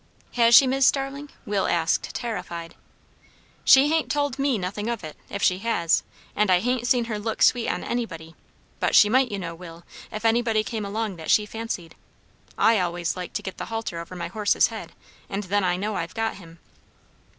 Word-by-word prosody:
"Has 235 -1 +5
she, 275 - +9
Mis' 265 0 +3
Starling?" 275 +1 -1 0.2
Will 200 -1 0
asked, 165 -1 0
terrified. 170 -8 -5 0.9
"She 270 +2 +7
hain't 320 0 +1
told 285 -2 -1
me 275 -3 +1
nothing 200 +4 -4
of 235 -3 -3
it, 155 -1 -8
if - - -4
she 180 0 +3
has; 190 -7 +1 0.3
and 210 -1 +2
I 180 -1 +5
hain't 245 +2 -1
seen 250 -3 +2
her 215 -2 -4
look 220 +1 -1
sweet 245 -2 +3
on - - -2
anybody; 165 -10 -4 0.5
but - - +1
she 210 - +7
might, 255 +1 +3
you 205 - -2
know, 170 -3 -5
Will, 170 0 -11 0.3
if 215 +1 -6
anybody 225 -1 +2
came 220 -2 -4
along 205 -1 -3
that 160 - -8
she 210 - +4
fancied. 210 -6 -6 0.6
I 225 -2 +4
always 175 -1 -2
like 180 -1 -6
to - - -3
get 190 - -6
the - - -4
halter 225 -7 -4
over 170 +2 -8
my 170 -1 -5
horse's 210 +2 +2
head, - - -8 0.4
and 195 +2 -3
then 200 +1 0
I 180 -1 +1
know 210 +3 -2
I've 165 -3 -4
got 225 -2 -2
him." 165 -3 -14
210 Hz, 195 wpm, -24 LUFS, 180-235 Hz, 0.9 s, she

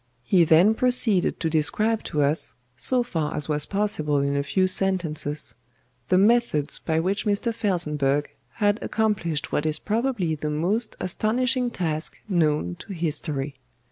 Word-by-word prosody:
He 170 +7 +4
then 170 +7 +5
proceeded 230 -5 +2
to 165 - +1
describe 210 +8 +1
to 150 -1 0
us, 145 +3 0 0.2
so 245 - +3
far 160 -10 -3
as 150 - -3
was 150 -1 0
possible 195 -8 -1
in 140 0 0
a 140 - +1
few 185 +7 +1
sentences, 175 -6 -1 0.6
the 185 - +4
methods 205 -8 +2
by 160 -1 -1
which 195 +6 -1
Mr. 210 +3 0
FELSENBURGH 150 -9 0 0.2
had 205 -1 +1
accomplished 195 -9 -1
what 150 - 0
is 155 -1 +1
probably 215 -4 -1
the 150 0 -3
most 190 +10 0
astonishing 245 +7 0
task 160 -7 -3
known 150 - 0
to 200 - -8
history. 150 -5 -3
175 Hz, 145 wpm, -24 LUFS, 150-215 Hz, 0.6 s, then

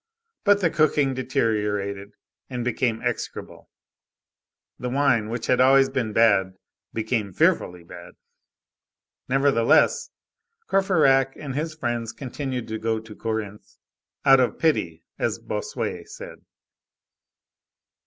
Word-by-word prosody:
But 205 -1 +4
the 170 -3 +2
cooking 150 -3 +2
deteriorated, 105 -6 -2 0.4
and 125 -2 -4
became 120 -2 -1
execrable; - - -5 1.1
the 125 - -3
wine, 125 -5 +2
which 115 0 -4
had 125 - +3
always 135 +1 +5
been 115 -4 -2
bad, 100 -4 +3 0.4
became 110 -2 -2
fearfully 90 0 +1
bad. 85 +1 -12 1.2
Nevertheless, 135 -3 +3 0.6
Courfeyrac 150 -9 +3
and 140 -3 -6
his 155 +3 -3
friends 120 -5 -3
continued 130 0 -5
to 110 0 -4
go 110 0 -1
to 110 -1 -12
Corinthe,—out 110 +5 -1
of 125 - +1
pity, 85 - 0 0.2
as - - 0
Bossuet - - -5
said. - - -10
120 Hz, 105 wpm, -24 LUFS, 110-135 Hz, 1.2 s, always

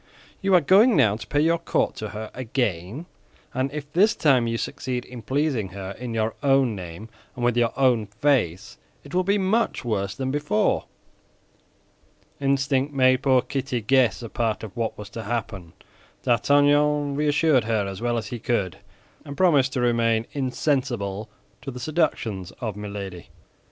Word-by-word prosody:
You 195 -1 +3
are 175 - +6
going 205 - +5
now 105 -8 +4
to 110 - -9
pay 145 - +1
your 165 +2 +2
court 165 - 0
to 110 - -5
her 110 +1 -7
again, 120 - -2 0.5
and 130 +1 -1
if 150 0 -7
this 210 +6 +4
time 130 -6 +3
you 115 0 -1
succeed 125 +1 -4
in 125 -2 -9
pleasing 135 -4 0
her 95 -1 -5
in 115 +3 -6
your 110 0 0
own 135 -5 +3
name 90 +2 -8 0.3
and 120 - -2
with 120 -1 +2
your 120 -1 +2
own 125 -5 +3
face, 105 - 0 0.2
it 145 - -13
will 185 +1 +2
be 200 +2 +2
much 205 - 0
worse 100 -3 -1
than 130 -1 -2
before." 145 -7 +1 1.5
Instinct 135 0 +1
made 130 -1 +4
poor 130 -2 +3
Kitty 135 -2 -2
guess 120 -2 +2
a 115 - -6
part 115 -1 -1
of 110 -1 -8
what 115 -2 -2
was 105 - -9
to 115 - -6
happen. 105 -6 -4 0.5
D'Artagnan 145 +3 +3
reassured 150 -3 +2
her 110 -3 0
as 95 0 -6
well 120 0 0
as 110 -2 -4
he 120 - -5
could, 105 -7 -1 0.5
and 140 -2 -9
promised 145 -8 +3
to 125 - -1
remain 115 -2 +2
insensible 125 -7 -1 0.3
to - - -6
the 125 -1 -7
seductions 120 - -1
of 110 -6 -4
Milady. 100 -4 -7
125 Hz, 165 wpm, -24 LUFS, 110-145 Hz, 1.5 s, are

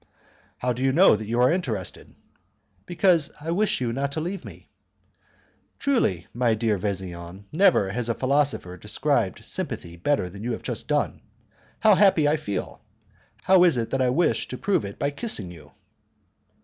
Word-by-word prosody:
"How 125 0 -1
do 120 - -7
you 135 0 +2
know 170 - +6
that 105 0 -6
you 120 +2 -1
are 125 +3 +5
interested?" 115 - -4 0.7
"Because 175 -3 +2
I 160 +3 -4
wish 205 +5 +1
you 120 -2 -2
not 140 +2 -2
to 155 - -2
leave 180 +5 -4
me." - - -12 1.1
"Truly, 230 - 0
my 120 -2 +1
dear 110 -3 0
Vesian, 95 -1 -5
never 170 - +3
has 120 +2 -3
a 115 - 0
philosopher 135 -9 0
described - - -1
sympathy 85 0 -4
better 115 - 0
than 100 +4 -10
you 120 +1 -2
have - - -6
just - - -3
done. - - -1 0.6
How 220 -1 +6
happy 190 -6 +4
I 150 +2 +2
feel! 100 -11 -5 0.6
How 185 -1 +5
is 170 -8 +4
it 115 -1 -2
that 135 - 0
I 130 - +2
wish 165 +8 +1
to - - -6
prove 190 - 0
it 100 - -8
by 140 - -1
kissing 140 - +1
you?" 85 -3 -14
125 Hz, 175 wpm, -24 LUFS, 100-170 Hz, 1.1 s, know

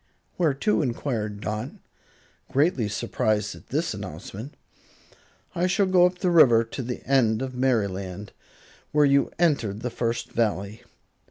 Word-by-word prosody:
"Where 160 -6 +2
to?" 210 +8 +1
enquired 115 -6 -3
Dot, 110 +5 -3 0.8
greatly 140 - +2
surprised 105 0 -1
at - - -15
this 155 +5 -1
announcement. 100 - -8 1.0
"I 175 +2 +1
shall 195 +2 +2
go 180 -1 +5
up 180 0 -6
the 180 -1 0
river 125 -9 +6
to 115 +4 -6
the 125 0 -6
end 120 -3 +2
of 130 -1 -5
Merryland, 100 -6 -1 0.6
where 150 0 +4
you 140 0 +3
entered 130 - +1
the 125 - -3
First 115 0 -2
Valley. 105 -2 -1
120 Hz, 140 wpm, -25 LUFS, 105-145 Hz, 1.0 s, river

